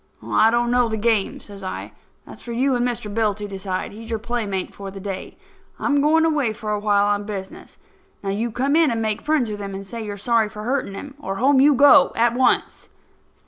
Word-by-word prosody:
"I 220 Hz, -, +4 dB
don't 240 Hz, +1 st, +1 dB
know 245 Hz, -1 st, +3 dB
the 220 Hz, -, -2 dB
game," 220 Hz, -2 st, +1 dB
says 200 Hz, -1 st, -7 dB
I. 185 Hz, -, -6 dB, 0.3 s
"That's -, -, -11 dB
for 235 Hz, -, -7 dB
you 260 Hz, +3 st, +1 dB
and 245 Hz, -1 st, +1 dB
Mr. 220 Hz, -4 st, -4 dB
Bill 215 Hz, -2 st, +1 dB
to 210 Hz, 0 st, -6 dB
decide. 190 Hz, -1 st, -4 dB
He's 225 Hz, +2 st, -10 dB
your 225 Hz, -, -1 dB
playmate 215 Hz, -4 st, -3 dB
for 195 Hz, -1 st, -8 dB
the 195 Hz, 0 st, -9 dB
day. 195 Hz, -1 st, -6 dB, 0.4 s
I'm 285 Hz, -1 st, +1 dB
going 320 Hz, +2 st, +4 dB
away 290 Hz, -8 st, +1 dB
for 215 Hz, 0 st, -5 dB
a 210 Hz, -, 0 dB
while, 205 Hz, -1 st, +2 dB
on 205 Hz, 0 st, 0 dB
business. 195 Hz, -2 st, -8 dB, 0.5 s
Now, 195 Hz, -, -1 dB
you 220 Hz, +4 st, -1 dB
come 265 Hz, +6 st, 0 dB
in 325 Hz, -2 st, +5 dB
and 230 Hz, -1 st, -1 dB
make 215 Hz, -2 st, -1 dB
friends 295 Hz, -7 st, 0 dB
with 205 Hz, -, -5 dB
him 200 Hz, -1 st, -5 dB
and 195 Hz, 0 st, -7 dB
say 230 Hz, +3 st, -6 dB
you 210 Hz, -1 st, -5 dB
are -, -, -9 dB
sorry 225 Hz, +1 st, +1 dB
for 210 Hz, 0 st, -8 dB
hurting 250 Hz, -4 st, -2 dB
him, 275 Hz, +7 st, -8 dB
or 195 Hz, -9 st, -4 dB
home 265 Hz, +5 st, +4 dB
you 290 Hz, +1 st, +5 dB
go, 285 Hz, +2 st, +6 dB
at 235 Hz, +1 st, +3 dB
once." 255 Hz, +1 st, +1 dB
225 Hz, 230 wpm, -22 LUFS, 205-250 Hz, 0.5 s, go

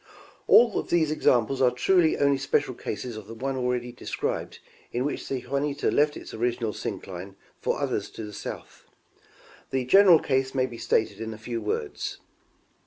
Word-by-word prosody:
All 235 Hz, -3 st, +6 dB
of -, -, -6 dB
these 160 Hz, -3 st, +2 dB
examples 130 Hz, -3 st, +2 dB
are 125 Hz, -, +6 dB
truly 160 Hz, +7 st, +3 dB
only 140 Hz, -1 st, +3 dB
special 135 Hz, -1 st, 0 dB
cases 115 Hz, +1 st, -5 dB
of 110 Hz, -2 st, -9 dB
the 115 Hz, -, -8 dB
one 135 Hz, +3 st, -3 dB
already 125 Hz, -1 st, -1 dB
described 120 Hz, -, -4 dB, 0.3 s
in 125 Hz, +2 st, -1 dB
which 145 Hz, -, -3 dB
the 130 Hz, -2 st, -2 dB
Juniata 140 Hz, +2 st, -1 dB
left 150 Hz, 0 st, +2 dB
its -, -, -10 dB
original 115 Hz, -1 st, -1 dB
syncline 95 Hz, -1 st, -6 dB, 0.2 s
for -, -, -1 dB
others -, -, -2 dB
to 110 Hz, -, -5 dB
the 105 Hz, -1 st, -8 dB
south. -, -, -8 dB, 0.8 s
The 130 Hz, -1 st, -1 dB
general 190 Hz, +4 st, +7 dB
case 135 Hz, -2 st, 0 dB
may 130 Hz, -1 st, +3 dB
be 120 Hz, -3 st, -8 dB
stated 110 Hz, -1 st, 0 dB
in 110 Hz, -1 st, -4 dB
a -, -, -11 dB
few 115 Hz, +1 st, -4 dB
words. 105 Hz, -8 st, -3 dB
125 Hz, 175 wpm, -26 LUFS, 115-140 Hz, 0.8 s, general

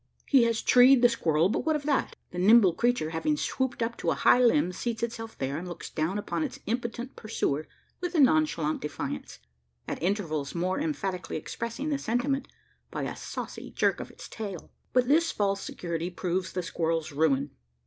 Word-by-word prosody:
He 265 Hz, -5 st, +5 dB
has 230 Hz, -1 st, 0 dB
"treed" 250 Hz, 0 st, +7 dB
the 245 Hz, -, +8 dB
squirrel; 165 Hz, -7 st, +2 dB
but 205 Hz, -, -1 dB
what 315 Hz, -1 st, +2 dB
of 295 Hz, -, -2 dB
that? 285 Hz, -2 st, 0 dB, 0.2 s
The 180 Hz, -, -5 dB
nimble 200 Hz, -1 st, +6 dB
creature, 235 Hz, -7 st, +1 dB
having 295 Hz, -, 0 dB
swooped 260 Hz, -4 st, -1 dB
up 230 Hz, +1 st, -2 dB
to -, -, -1 dB
a -, -, +2 dB
high -, -, +5 dB
limb, 245 Hz, -4 st, +4 dB
seats 225 Hz, +4 st, -3 dB
itself 225 Hz, -1 st, -4 dB
there, 135 Hz, +2 st, -2 dB
and 180 Hz, -, -7 dB
looks 175 Hz, -, -7 dB
down 160 Hz, +6 st, -1 dB
upon 205 Hz, -, -2 dB
its 290 Hz, -, -4 dB
impotent 235 Hz, +2 st, -3 dB
pursuer 155 Hz, -9 st, -2 dB, 0.3 s
with 355 Hz, 0 st, -3 dB
a -, -, +3 dB
nonchalant 155 Hz, -, +3 dB
defiance 150 Hz, -1 st, -5 dB, 0.5 s
at -, -, -4 dB
intervals 165 Hz, -7 st, -1 dB
more 185 Hz, +5 st, 0 dB
emphatically 195 Hz, -, -2 dB
expressing 235 Hz, -, -4 dB
the 285 Hz, -2 st, 0 dB
sentiment 270 Hz, +3 st, 0 dB, 0.4 s
by -, -, -4 dB
a -, -, -3 dB
saucy -, -, -6 dB
jerk -, -, +1 dB
of -, -, -6 dB
its -, -, -11 dB
tail. 200 Hz, -6 st, -7 dB, 0.2 s
But 250 Hz, -1 st, +3 dB
this 330 Hz, +4 st, +4 dB
false 195 Hz, -1 st, 0 dB
security 170 Hz, 0 st, -4 dB
proves 180 Hz, 0 st, -2 dB
the 180 Hz, -, -2 dB
squirrel's 165 Hz, -1 st, -1 dB
ruin. 145 Hz, -1 st, +1 dB
210 Hz, 185 wpm, -28 LUFS, 165-245 Hz, 0.5 s, the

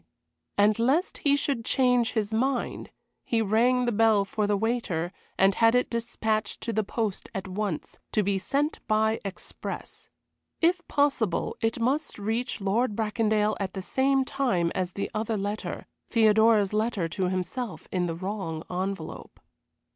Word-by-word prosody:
And 210 Hz, +2 st, +4 dB
lest 275 Hz, +10 st, +1 dB
he 285 Hz, -1 st, +3 dB
should 280 Hz, -4 st, -1 dB
change 250 Hz, -2 st, +2 dB
his 220 Hz, -1 st, -1 dB
mind, 255 Hz, +2 st, -1 dB, 0.3 s
he 230 Hz, -, 0 dB
rang 235 Hz, +4 st, +3 dB
the 240 Hz, -, +1 dB
bell 220 Hz, -2 st, +4 dB
for 210 Hz, +1 st, -1 dB
the 205 Hz, -1 st, +2 dB
waiter, 200 Hz, -6 st, -1 dB, 0.2 s
and 195 Hz, +1 st, +5 dB
had 225 Hz, +4 st, +4 dB
it 250 Hz, -, +2 dB
despatched 220 Hz, -2 st, -1 dB
to 230 Hz, -, -2 dB
the 220 Hz, +1 st, +1 dB
post 210 Hz, -1 st, -3 dB
at 195 Hz, -1 st, -3 dB
once 190 Hz, -3 st, -4 dB
to 215 Hz, -, +3 dB
be 195 Hz, 0 st, +1 dB
sent 285 Hz, +9 st, -1 dB
by 220 Hz, 0 st, +2 dB
express. 195 Hz, -2 st, -7 dB, 0.5 s
If 345 Hz, +2 st, +3 dB
possible 275 Hz, -, +1 dB
it 225 Hz, +1 st, 0 dB
must 265 Hz, +7 st, 0 dB
reach 225 Hz, +5 st, -2 dB
Lord 210 Hz, +3 st, +1 dB
Bracondale 215 Hz, -1 st, +1 dB
at 195 Hz, -1 st, -3 dB
the 190 Hz, -, -4 dB
same 270 Hz, +4 st, +2 dB
time 240 Hz, -12 st, 0 dB
as 185 Hz, -1 st, -2 dB
the 200 Hz, -, -3 dB
other 220 Hz, 0 st, -1 dB
letter 205 Hz, +2 st, -4 dB, 0.2 s
Theodora's 220 Hz, -2 st, +4 dB
letter 215 Hz, -5 st, 0 dB
to 185 Hz, +2 st, -1 dB
himself 185 Hz, +5 st, -4 dB
in 180 Hz, -1 st, 0 dB
the 165 Hz, -, -3 dB
wrong 185 Hz, -3 st, -4 dB
envelope. 180 Hz, -3 st, -4 dB
220 Hz, 155 wpm, -27 LUFS, 195-240 Hz, 0.5 s, and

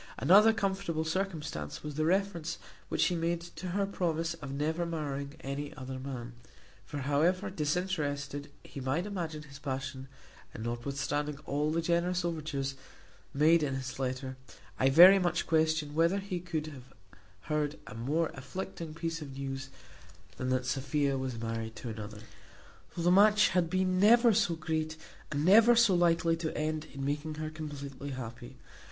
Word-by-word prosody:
Another 210 Hz, +5 st, +7 dB
comfortable 190 Hz, -6 st, -1 dB
circumstance 160 Hz, -, -3 dB
was 150 Hz, -1 st, -5 dB
the 155 Hz, +2 st, 0 dB
reference 170 Hz, -2 st, 0 dB, 0.3 s
which -, -, 0 dB
she -, -, +3 dB
made 170 Hz, +1 st, 0 dB
to 175 Hz, +2 st, -8 dB
her 195 Hz, +3 st, 0 dB
promise 165 Hz, -4 st, -1 dB
of 145 Hz, -5 st, -8 dB
never 155 Hz, +5 st, -1 dB
marrying 145 Hz, -4 st, -4 dB
any 140 Hz, +2 st, -5 dB
other 130 Hz, -1 st, -6 dB
man; 125 Hz, -3 st, -6 dB, 0.5 s
for 145 Hz, -, -5 dB
however 170 Hz, +8 st, +1 dB
disinterested 150 Hz, -4 st, -2 dB
he -, -, -9 dB
might 135 Hz, +7 st, -1 dB
imagine 165 Hz, -7 st, -4 dB
his 140 Hz, -1 st, -12 dB
passion, 135 Hz, 0 st, -4 dB, 0.5 s
and 110 Hz, -, -6 dB
notwithstanding 140 Hz, +5 st, -2 dB
all 145 Hz, +2 st, 0 dB
the 165 Hz, +1 st, 0 dB
generous 175 Hz, +1 st, +1 dB
overtures 150 Hz, -5 st, -2 dB, 0.6 s
made 155 Hz, +4 st, +4 dB
in 140 Hz, -3 st, -1 dB
his 130 Hz, 0 st, -5 dB
letter, 130 Hz, 0 st, -3 dB, 0.4 s
I 130 Hz, -, +4 dB
very 180 Hz, +7 st, +9 dB
much 175 Hz, -2 st, 0 dB
question 155 Hz, -2 st, +1 dB
whether 165 Hz, +5 st, +3 dB
he 195 Hz, -2 st, -3 dB
could 170 Hz, -3 st, -3 dB
have 135 Hz, -5 st, -11 dB, 0.5 s
heard 150 Hz, 0 st, -1 dB
a -, -, -9 dB
more 145 Hz, +9 st, 0 dB
afflicting 155 Hz, +3 st, -6 dB
piece 165 Hz, 0 st, -3 dB
of 135 Hz, -3 st, -8 dB
news 135 Hz, -1 st, -4 dB, 0.7 s
than 130 Hz, -, -2 dB
that 130 Hz, 0 st, +1 dB
Sophia 140 Hz, +1 st, 0 dB
was 130 Hz, -3 st, -3 dB
married 115 Hz, -1 st, -4 dB
to 120 Hz, -, -6 dB
another, 110 Hz, -1 st, -7 dB, 0.7 s
though 170 Hz, -, -3 dB
the 175 Hz, -, +4 dB
match 210 Hz, +2 st, +6 dB
had 170 Hz, -2 st, +1 dB
been 185 Hz, 0 st, +1 dB
never 230 Hz, +3 st, +6 dB
so 190 Hz, -5 st, +2 dB
great, 155 Hz, 0 st, -2 dB, 0.3 s
and 145 Hz, +1 st, 0 dB
never 225 Hz, +6 st, +7 dB
so 235 Hz, -4 st, +5 dB
likely 170 Hz, -1 st, +3 dB
to 160 Hz, -1 st, -3 dB
end 155 Hz, 0 st, -1 dB
in 135 Hz, -1 st, -5 dB
making 150 Hz, +2 st, -2 dB
her 155 Hz, 0 st, -4 dB
completely 140 Hz, -3 st, -7 dB
happy. 125 Hz, 0 st, -7 dB
155 Hz, 160 wpm, -31 LUFS, 135-170 Hz, 0.7 s, very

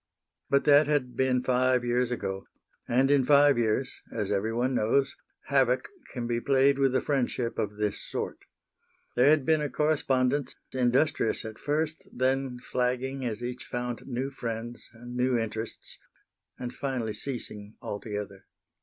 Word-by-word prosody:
But 140 Hz, 0 st, +3 dB
that 145 Hz, 0 st, +6 dB
had 130 Hz, -5 st, 0 dB
been 125 Hz, 0 st, +2 dB
five 125 Hz, -1 st, +2 dB
years 120 Hz, 0 st, +1 dB
ago, 95 Hz, -5 st, -4 dB, 0.4 s
and 130 Hz, +3 st, +3 dB
in 140 Hz, -2 st, +5 dB
five 145 Hz, -1 st, +5 dB
years, 120 Hz, +3 st, 0 dB
as 105 Hz, -3 st, -2 dB
everyone 115 Hz, +6 st, 0 dB
knows, 135 Hz, +4 st, +2 dB, 0.3 s
havoc 130 Hz, -2 st, +2 dB, 0.2 s
can 120 Hz, -3 st, -4 dB
be 120 Hz, 0 st, -1 dB
played 140 Hz, +1 st, +3 dB
with 135 Hz, -1 st, +3 dB
a -, -, +3 dB
friendship 125 Hz, -4 st, -1 dB
of 105 Hz, 0 st, -2 dB
this 105 Hz, -1 st, -1 dB
sort. -, -, -4 dB, 0.8 s
There 125 Hz, +3 st, +5 dB
had 150 Hz, -3 st, +4 dB
been 160 Hz, -1 st, +3 dB
a 150 Hz, -, -1 dB
correspondence, 140 Hz, -3 st, +1 dB, 0.2 s
industrious 130 Hz, -1 st, +1 dB
at 110 Hz, 0 st, -7 dB
first, 155 Hz, +2 st, -2 dB
then 130 Hz, 0 st, 0 dB
flagging 125 Hz, +2 st, -2 dB
as 115 Hz, 0 st, -3 dB
each 125 Hz, +1 st, -5 dB
found 120 Hz, -1 st, -4 dB
new 130 Hz, +1 st, -2 dB
friends 120 Hz, -2 st, -6 dB
and 120 Hz, +1 st, -10 dB
new 125 Hz, 0 st, +2 dB
interests, 115 Hz, 0 st, -5 dB, 0.6 s
and 125 Hz, 0 st, -5 dB
finally 125 Hz, -6 st, -2 dB
ceasing 110 Hz, -6 st, -6 dB
altogether. 105 Hz, -1 st, -6 dB
125 Hz, 145 wpm, -28 LUFS, 120-135 Hz, 0.8 s, that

